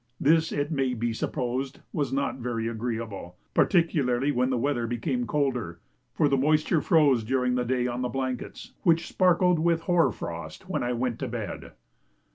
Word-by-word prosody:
This, 160 +2 +3
it 145 +2 -2
may 135 -4 0
be 115 0 -1
supposed, 130 +2 -3
was 140 -5 -1
not 135 0 -1
very 115 -2 -2
agreeable, 110 -6 -4 0.2
particularly 145 -7 +2
when 125 -1 +1
the 130 - 0
weather 120 -2 0
became 120 +1 -2
colder, 125 - -1 0.3
for 150 - +2
the 140 - +2
moisture 155 +3 +2
froze 145 -9 +4
during 125 +2 +1
the 125 0 +1
day 125 0 0
on 125 0 -2
the 125 - -1
blankets, 130 -1 -4
which 165 -1 +3
sparkled 180 -1 +3
with 165 0 +2
hoar 170 -7 +3
frost - - -7
when - - -2
I 120 0 -1
went 120 -1 -2
to - - -3
bed. - - -6
130 Hz, 170 wpm, -27 LUFS, 120-150 Hz, 0.3 s, froze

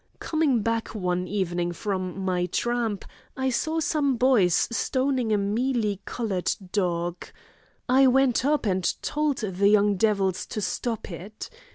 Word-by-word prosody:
Coming 295 -8 +1
back 230 0 -2
one 180 -2 -1
evening 175 -3 -1
from 190 0 -3
my 180 -1 0
tramp, 230 0 -1 0.3
I 265 0 0
saw 315 +6 0
some 290 -4 +1
boys 225 -9 +3
stoning 255 -1 0
a 210 - +3
mealy 210 0 0
coloured 205 -7 -2 0.2
dog. 175 -3 -1 0.6
I 265 +1 +5
went 260 -1 +3
up 295 -1 +1
and 185 -3 +1
told 300 -2 0
the 200 -2 +1
young 205 -1 +4
devils 195 -3 +1
to - - -4
stop 225 +1 -3
it. 190 +6 -8
215 Hz, 140 wpm, -25 LUFS, 185-255 Hz, 0.6 s, I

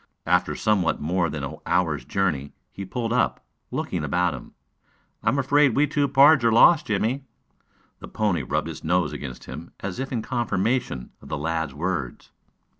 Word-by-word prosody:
After - - +2
somewhat 100 -6 +1
more 85 +2 0
than 75 -1 -5
an 70 - -5
hour's 75 -7 +1
journey 75 -4 -1 0.2
he 100 - -7
pulled 115 +3 -3
up, 125 - 0 0.2
looking - - -3
about 85 +3 +1
him. 65 - -10 0.7
"I - - +2
am 130 - +1
afraid 140 -2 +3
we 145 - +4
two 145 0 0
pards 140 0 +6
are 115 - +4
lost, 150 +8 +6
Jimmie." 115 +6 0 0.8
The - - -9
pony 105 -5 0
rubbed - - -2
its - - -8
nose 85 -1 +1
against 65 -3 -7
him 85 - -9
as 95 +2 -5
if 135 0 -4
in 115 -4 -2
confirmation 115 - -1
of - - -13
the - - -2
lad's 80 -2 -2
words. 80 -6 -4
95 Hz, 175 wpm, -24 LUFS, 80-125 Hz, 0.8 s, pards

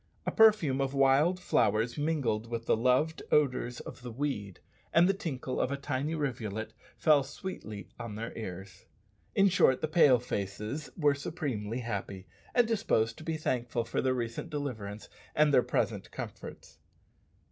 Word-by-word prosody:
A - - 0
perfume 205 - +5
of 135 0 -1
wild 140 +7 +4
flowers 115 -8 +1
mingled 140 -8 0
with 115 0 -4
the - - +3
loved 130 +7 +2
odours 125 -4 +2
of - - -10
the 125 - -7
"weed," 110 -7 -3 0.3
and 170 +2 +5
the 195 - +3
tinkle 145 -10 -3
of 130 - 0
a 140 - -1
tiny 140 +3 -2
rivulet 110 -7 -3 0.2
fell 150 -2 +5
sweetly 135 - -7
on 115 -3 -6
their 115 +2 -6
ears. 95 -3 -8 0.5
In 195 - +5
short, 175 -8 +4
the 155 - -1
"Pale 150 -5 +6
faces" 105 +6 -4
were 150 -4 +4
supremely 130 -7 -3
happy, 100 -4 -5 0.3
and 245 -2 +5
disposed 115 - +1
to - - -9
be 160 0 -2
thankful 120 -5 -1
for 120 - -1
their 130 -1 +1
recent 120 +6 -4
deliverance 110 -9 -5 0.3
and 150 -1 +4
their 125 - +7
present - - -1
comforts. - - -9
130 Hz, 160 wpm, -30 LUFS, 115-155 Hz, 0.5 s, their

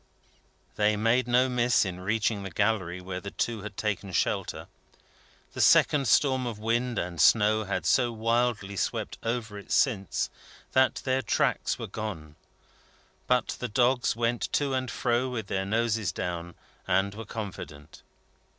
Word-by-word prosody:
They 105 0 +2
made 115 +3 +2
no 125 +2 +4
miss 125 -3 +2
in 90 -1 -5
reaching 105 +2 0
the 95 - -5
Gallery 95 -2 0
where 90 0 -5
the 100 - -6
two 115 +1 -2
had 105 -1 -8
taken 100 -2 -2
shelter. 85 - -1 0.9
The - - -2
second 140 -3 +5
storm 130 +1 +3
of 115 -3 -4
wind 115 +2 -1
and 85 -4 -2
snow 110 +2 +4
had 95 -4 -2
so 120 +9 +3
wildly 115 -2 0
swept - - -2
over 115 -3 -3
it 100 - -13
since, 100 - +1 0.4
that 130 0 +2
their 130 0 +1
tracks 110 - 0
were - - -5
gone. 85 -9 -6 0.9
But 125 -2 +2
the 125 - -2
dogs 125 +3 +2
went 120 0 -1
to 140 -2 +1
and 130 -1 -1
fro 120 +1 0
with 115 -4 -4
their 95 0 -2
noses 110 0 0
down, 85 -1 -5 0.3
and 100 +1 +1
were 110 +2 -7
confident. 95 -9 -8
110 Hz, 150 wpm, -28 LUFS, 95-120 Hz, 0.9 s, second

